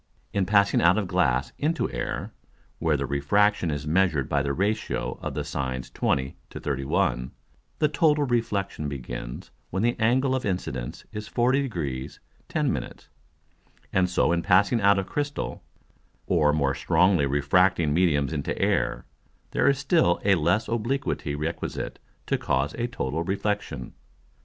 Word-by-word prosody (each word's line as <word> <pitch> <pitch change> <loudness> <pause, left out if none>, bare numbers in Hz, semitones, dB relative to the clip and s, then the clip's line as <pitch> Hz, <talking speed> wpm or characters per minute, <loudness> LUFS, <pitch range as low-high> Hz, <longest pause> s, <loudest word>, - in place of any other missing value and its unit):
In 100 -2 +1
passing 100 0 +4
out 85 +3 +5
of 105 -3 -1
Glass 60 -6 +1
into 160 +3 0
Air, - - -4 0.5
where 80 -3 +2
the 70 - -2
Refraction 85 +8 +2
is 75 -1 -3
measured 80 -4 +2
by 70 - +1
the 70 0 -1
Ratio 105 +8 -1
of - - -4
the - - -1
Sines 65 -1 -4
20 65 0 0
to - - -8
31, 65 -3 0 0.5
the 150 - +3
total 150 0 +3
Reflexion 105 - -1
begins - - -6 0.2
when 95 +3 -1
the 120 +1 +2
Angle 130 +4 +2
of 130 - -1
Incidence 65 -11 -3
is 105 0 -6
40 130 +3 +2
Degrees 75 - -4 0.3
10 - - +1
Minutes; - - -6 0.8
and 95 -1 +3
so 90 - +2
in 85 0 +1
passing 100 +6 +3
out 100 0 +5
of 95 - -1
Crystal, 145 +4 -3 0.6
or 75 -4 +3
more 70 -2 +1
strongly 80 +1 +3
refracting 75 +3 +3
Mediums 80 -4 +2
into 70 -3 -2
Air, - - 0 0.5
there - - +3
is 140 - +2
still 140 - +2
a 100 - +5
less 95 +6 +2
obliquity 115 - -1
requisite 80 +3 -4 0.3
to - - 0
cause 70 +2 0
a 120 0 -2
total 80 - -3
reflexion. 95 - -3
90 Hz, 150 wpm, -26 LUFS, 70-105 Hz, 0.8 s, out